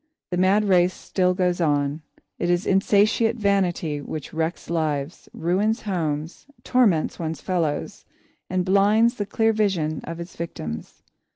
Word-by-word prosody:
The 180 - -1
mad 190 +3 +3
race 180 -1 +3
still 180 -1 0
goes 180 -1 0
on. 145 -1 +1 0.4
It 175 - 0
is 175 +2 +1
insatiate 210 +4 +3
vanity 185 -8 0
which 150 0 -7
wrecks 160 +2 -2
lives, 155 -2 -2
ruins 195 +7 0
homes, 165 - -3 0.2
torments 215 -11 +2
one's 160 -3 -3
fellows, 165 -5 -2 0.5
and 185 0 0
blinds 205 +5 +4
the 205 - -3
clear 225 +1 +2
vision 180 -8 0
of 165 +1 -6
its 170 +1 -8
victims. 80 - -7
180 Hz, 135 wpm, -23 LUFS, 160-200 Hz, 0.5 s, blinds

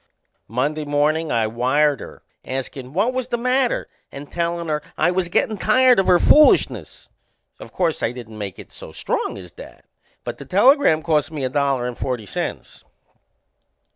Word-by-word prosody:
Monday 145 +6 -2
mornin' 150 +2 0
I 115 -1 +1
wired 130 +5 +1
her - - -11 0.2
askin' 130 0 -6
what 205 - 0
was 255 -1 -2
the 240 - -2
matter 250 +1 0 0.2
and 140 +1 -10
tellin' 170 0 -2
her 150 -1 -1 0.2
I 175 +3 +2
was 180 -1 -1
gettin' 210 +3 0
tired 250 +1 +4
of 195 - +1
her 180 - +6
foolishness. 300 +11 +3 0.5
O' - - -10
course 170 -4 -1
I 115 - 0
didn't 115 -3 -10
make 100 -3 -6
it - - -13
so - - -10
strong - - -3
as 90 -3 -11
that - - -14 0.4
but - - -6
the - - -9
telegram 205 - +4
cost 155 -3 +1
me 150 -4 -5
a 130 - 0
dollar 135 -2 0
and 125 - -5
forty 125 -4 -4
cents. - - -6
150 Hz, 170 wpm, -21 LUFS, 130-185 Hz, 0.5 s, her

